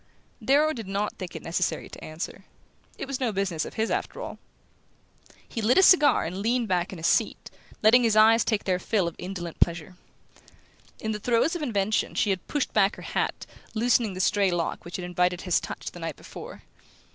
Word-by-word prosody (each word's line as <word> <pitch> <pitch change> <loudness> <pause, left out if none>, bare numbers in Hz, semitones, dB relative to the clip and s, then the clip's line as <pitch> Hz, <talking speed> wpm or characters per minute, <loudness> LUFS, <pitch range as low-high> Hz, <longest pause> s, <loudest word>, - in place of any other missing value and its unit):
Darrow 300 +3 +3
did 225 -7 -7
not 200 +2 -2
think 185 -3 -7
it - - -7
necessary 170 +2 -1
to - - -11
answer. 155 +2 -6 0.5
It - - -4
was 270 -1 -4
no 250 -4 0
business 190 -5 -1
of - - -9
his, 220 0 -1
after - - -2
all. - - -7 1.1
He 225 - -4
lit 225 +4 +3
a 380 - +7
cigar 300 -6 +6
and 180 +4 -4
leaned 235 +3 0
back 180 -2 0
in 190 - -7
his 160 - -5
seat, - - +1 0.3
letting 230 +4 +7
his 225 -3 +2
eyes 220 +1 +6
take 215 -3 0
their 185 -2 0
fill 190 -1 0
of 170 - -4
indolent 180 -3 -6
pleasure. 170 +1 0 1.0
In 220 - -3
the 210 - -3
throes 240 - +1
of 345 - -4
invention 215 -6 0
she 205 - +2
had 190 -2 -3
pushed 290 -2 -2
back 195 +2 +3
her - - -11
hat, - - -2 0.3
loosening 225 -3 +2
the - - -6
stray 200 0 +3
lock 175 -2 -2
which 175 - -7
had 180 - -4
invited 180 0 0
his 180 -2 +2
touch - - -6
the - - -11
night - - -4
before. - - -10
200 Hz, 205 wpm, -26 LUFS, 180-230 Hz, 1.1 s, a